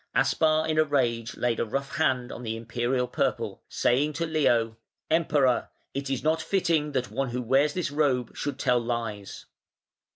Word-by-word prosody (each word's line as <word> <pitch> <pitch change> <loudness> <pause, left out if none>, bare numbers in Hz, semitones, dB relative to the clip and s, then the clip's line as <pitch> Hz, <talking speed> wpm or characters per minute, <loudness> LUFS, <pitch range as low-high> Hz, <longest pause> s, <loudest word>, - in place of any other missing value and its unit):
Aspar 155 0 +3
in 155 -1 +1
a - - +7
rage 120 -6 0
laid 120 -1 0
a - - +2
rough 140 +5 -3
hand 130 -5 +1
on - - -7
the 115 -2 -3
Imperial 120 +2 -1
purple, - - -2
saying 140 +5 +1
to 165 +3 -2
Leo: 120 -8 +1 0.3
"Emperor! 150 -6 +2 0.2
it 140 0 -3
is 135 -2 -2
not 160 +1 +2
fitting 160 -4 +1
that 130 -4 -1
one 135 +3 -1
who 125 +1 -2
wears 135 +5 +2
this 180 -5 -1
robe 135 -5 0
should 145 - -3
tell 125 -1 +2
lies". 115 -4 -4
135 Hz, 170 wpm, -27 LUFS, 120-150 Hz, 0.3 s, a